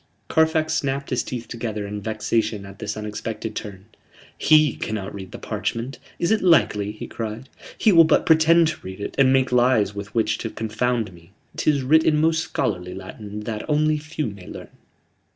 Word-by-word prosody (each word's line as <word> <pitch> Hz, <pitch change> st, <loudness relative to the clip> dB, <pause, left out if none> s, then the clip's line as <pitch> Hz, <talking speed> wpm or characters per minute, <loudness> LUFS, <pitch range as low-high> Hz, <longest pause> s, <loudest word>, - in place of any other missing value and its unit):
Carfax 160 Hz, 0 st, +2 dB
snapped 140 Hz, -2 st, -2 dB
his 125 Hz, -, +1 dB
teeth 120 Hz, -2 st, -6 dB
together 110 Hz, -3 st, -4 dB
in 105 Hz, 0 st, -5 dB
vexation 110 Hz, -1 st, -1 dB
at 100 Hz, 0 st, -12 dB
this 105 Hz, 0 st, -4 dB
unexpected 105 Hz, +1 st, -5 dB
turn. 100 Hz, -3 st, -7 dB, 0.5 s
"He 155 Hz, -3 st, +4 dB
cannot 105 Hz, -3 st, -4 dB
read 95 Hz, -2 st, -8 dB
the -, -, -7 dB
parchment. 115 Hz, +5 st, -4 dB, 0.2 s
Is 170 Hz, -, 0 dB
it 220 Hz, -, +3 dB
likely?" 105 Hz, -, +3 dB
he 110 Hz, -, -8 dB
cried. 115 Hz, +3 st, -6 dB, 0.3 s
"He 220 Hz, -, +4 dB
will 165 Hz, -3 st, +8 dB
but 155 Hz, -, +3 dB
pretend 160 Hz, +1 st, +5 dB
to -, -, -6 dB
read 95 Hz, +1 st, -8 dB
it, 100 Hz, -, -5 dB
and 130 Hz, -1 st, +6 dB
make 130 Hz, -1 st, +2 dB
lies 120 Hz, -5 st, +3 dB
with 100 Hz, +1 st, -8 dB
which 115 Hz, -, +1 dB
to 115 Hz, -, -3 dB
confound 110 Hz, -1 st, -2 dB
me. 85 Hz, +2 st, -18 dB, 0.2 s
'Tis 145 Hz, -3 st, +1 dB
writ 160 Hz, +5 st, +5 dB
in 150 Hz, -, +3 dB
most 160 Hz, +1 st, +3 dB
scholarly 90 Hz, -, -2 dB
Latin, 100 Hz, +2 st, -8 dB
that 105 Hz, -1 st, -4 dB
only 155 Hz, 0 st, +2 dB
few 155 Hz, +1 st, -4 dB
may 100 Hz, -5 st, -7 dB
learn." -, -, -9 dB
115 Hz, 185 wpm, -23 LUFS, 105-150 Hz, 0.5 s, will